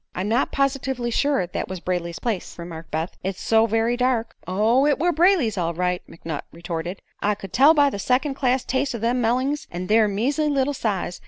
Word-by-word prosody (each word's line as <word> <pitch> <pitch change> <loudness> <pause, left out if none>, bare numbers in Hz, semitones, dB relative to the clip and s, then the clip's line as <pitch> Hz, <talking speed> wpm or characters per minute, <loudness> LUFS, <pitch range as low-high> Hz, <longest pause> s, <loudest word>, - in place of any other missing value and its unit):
"I'm 185 +2 -2
not 235 +5 +1
positively 265 -3 -1
sure 280 -6 +1
that 175 - -4
was 185 -1 -5
Brayley's 170 -1 -3
place," 220 -6 -3
remarked 170 -1 -8
Beth; 160 +3 -3
"it's 190 0 -3
so 225 0 +3
very 225 +2 +1
dark." 250 -2 0
"Oh, 220 +9 +3
it 295 - +3
were 350 +4 +2
Brayley's, 325 - +3
all 170 -1 -1
right," 180 +1 0
McNutt 165 -3 -6
retorted. 170 +2 -5 0.2
"I 210 0 +1
could 195 -2 -10
tell 285 +5 +6
by 285 -2 +4
the 200 - -5
second 260 +6 +1
class 260 -1 +1
taste 265 -1 -1
o' - - -2
them 235 +3 0
mellings, 260 +6 0
an' 175 +1 -5
their 215 +2 +4
measley 275 +10 0
little 280 0 +1
size. 195 -8 -2
225 Hz, 200 wpm, -23 LUFS, 180-270 Hz, 0.2 s, tell